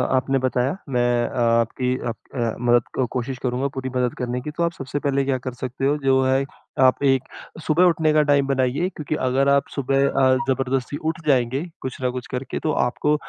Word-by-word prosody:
आपने 135 +1 +1
बताया, 130 +4 0
मैं 120 -2 +1
आपकी 115 +2 +1
अप 115 - -2 0.2
अ, 115 -3 -1
मदद 120 +1 +1
कोशिश 130 +1 -3
करूँगा, 125 +2 0
पूरी 130 -1 -5
मदद 125 -1 +1
करने 125 0 -2
की। 150 - -5
तो 170 +3 -2
आप 170 - +1
सबसे 140 0 -4
पहले 140 -1 0
क्या 135 -1 +1
कर 130 0 -6
सकते 130 +1 -4
हो, 145 +2 +3
जो 135 0 +4
है 130 +1 +2 0.4
आप 130 +2 +4
एक 135 -2 +3 0.4
सुबह 160 +3 +2
उठने 160 -3 +3
का 155 - +5
टाइम 140 -1 +4
बनाइए। 135 +4 +1
क्योंकि 155 0 -3
अगर 135 +2 +2
आप 140 0 +3
सुबह 135 0 +2
अ, 130 -1 +3 0.2
ज़बरदस्ती 135 0 -1
उठ 160 +1 -3
जाएँगे 130 0 +2 0.2
कुछ 130 - -5
न 125 - +1
कुछ 125 0 -6
करके, 130 +1 -4
तो 155 - -1
आपको 150 +3 +1
130 Hz, 200 wpm, -22 LUFS, 125-140 Hz, 0.4 s, का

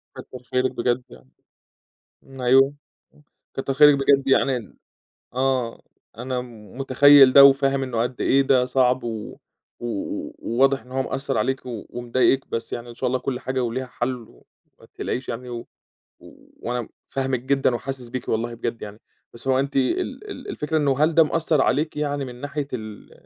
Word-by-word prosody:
كتّر 125 -1 -10
خيرِك 130 0 +1
بجد 120 +1 -1
يعني، - - -16 0.9
ن 135 -1 -13
أيوه، 135 +3 +4 0.4
امم، 150 - -23 0.3
كتّر 135 0 -2
خيرِك 150 0 +7
بجد 135 0 +3
يعني 135 -1 +3
ن 115 - -13 0.6
آه، 130 -2 -1 0.4
أنا 125 +1 -3
متخيّل 130 +4 +4
ده 140 - +10
وفاهم 135 0 +4
إنه 120 -3 -2
قدّ 125 +1 -3
إيه 135 +1 +4
ده 130 -2 +3
صعب 125 0 +2
و 110 -3 -6 0.4
و 120 - -7 0.6
وواضح 135 +3 +2
إن 125 - -18
هو 130 - 0
مأثّر 135 -2 -3
عليكِ 130 +5 0
ومضايقِك، 125 +2 -1
بس 115 0 -4
يعني 120 0 -6
إن 120 - -11
شاء 130 - -2
الله 125 +1 0
كُلّ 125 -2 -3
حاجة 130 -1 -2
وليها 125 +3 -3
حل 125 +1 -3
وما - - -24
تقلقيش 125 - -4
يعني، 125 +1 -5
و 120 -1 -7 0.9
وأنا 120 -1 -3 0.2
فاهمِك 135 -2 -1
جدًا 135 0 +1
وحاسس 130 0 -5
بيكِ 130 +1 -6
والله 115 +1 -1
بجد 115 0 -4
يعني، 105 +1 -9 0.3
بس 120 +3 -7
هو 130 - +3
أنتِ 140 +1 -2
ال 130 -2 -1
ال - - -9
الفكرة 155 +1 -1
إنه 140 -3 +1
هل 160 +1 +1
ده 165 - +7
مأثّر 155 -1 +1
عليكِ 155 +1 0
يعني 145 -1 -2
من 125 -2 -8
ناحية 145 0 -4
ال 110 -4 -7
130 Hz, 170 wpm, -23 LUFS, 120-135 Hz, 0.9 s, ده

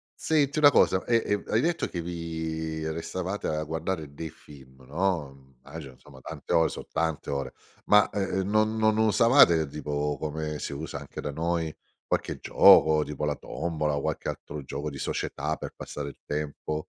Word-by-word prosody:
Senti 150 -2 +1
una 145 -1 +8
cosa: 95 -7 +4
e 120 - +2
e 105 0 0
hai 110 - +2
detto 170 +1 0
che 85 - -4
vi 80 -2 -4
restavate 90 +5 -3
a 75 0 -1
guardare 80 -1 -3
dei 80 +3 -6
film, 65 -4 -16
no? 80 0 -1
Mhmm, 65 -1 -22
immagino 70 -4 -9
insomma, - - -16
tante - - -5
ore 80 -1 +4
son - - -7
tante 80 -2 -1
ore, 70 -1 -3 0.3
ma, 105 0 +5
e 100 - -2 0.2
ehm, 95 +1 -1
non 110 +1 +2
non 110 0 +3
usavate, 110 - +5
tipo, 75 0 -2
come 75 0 -3
si - - -4
usa 70 0 -5
anche 70 - -8
da 75 - -3
noi, 80 +1 -1 0.3
qualche - - -1
gioco, 80 -1 +6
tipo 75 0 -4
la 75 -1 0
tombola 75 -3 -2
o 70 - -2
qualche - - -2
altro 75 -1 -6
gioco 70 +3 -4
di 70 - -8
società, 75 +3 -2
per - - -7
passare 70 -1 -6
il - - -14
tempo? 75 +1 -3
80 Hz, 180 wpm, -27 LUFS, 75-95 Hz, 0.3 s, una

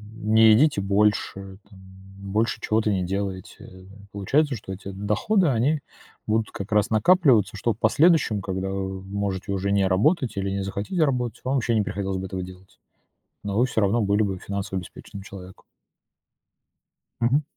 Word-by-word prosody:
не 110 +1 +4
едите 125 -3 +3
больше, 100 -1 0
там, 100 - -16
м, 95 +1 -13
больше 110 +3 0
чего-то 110 0 +1
не 95 -2 0
делаете. 95 0 -6 0.3
Получается, 135 +9 +1
что 100 -3 -7
эти 100 +1 -9
доходы, 105 - +1
они 140 +4 +1 0.4
будут 110 0 0
как 100 +3 -7
раз 105 +2 +2
накапливаться, 110 - +3
что 115 +2 0
в - - -20
последующем, 155 - +3
когда 95 0 -3
вы 95 -1 -4
можете 100 0 -4
уже 100 0 -1
не 100 -1 +2
работать 120 - +1
или 100 0 -1
не 100 0 -2
захотите 100 - -2
работать, 125 -5 -1
вам 130 +2 -1
вообще 120 -3 +1
не 110 - +3
приходилось 95 -1 -3
бы 95 - -4
этого 95 0 -5
делать, 95 +1 -14 0.6
но 100 0 -3
вы 125 - +4
всё 110 -3 -1
равно 100 +4 +2
были 100 +1 +2
бы 95 -2 -3
финансово 100 -1 -4
обеспеченным 95 +2 -11
человеком. 95 -2 -12 1.6
Мгм. 125 +6 +2
100 Hz, 165 wpm, -24 LUFS, 95-115 Hz, 1.6 s, не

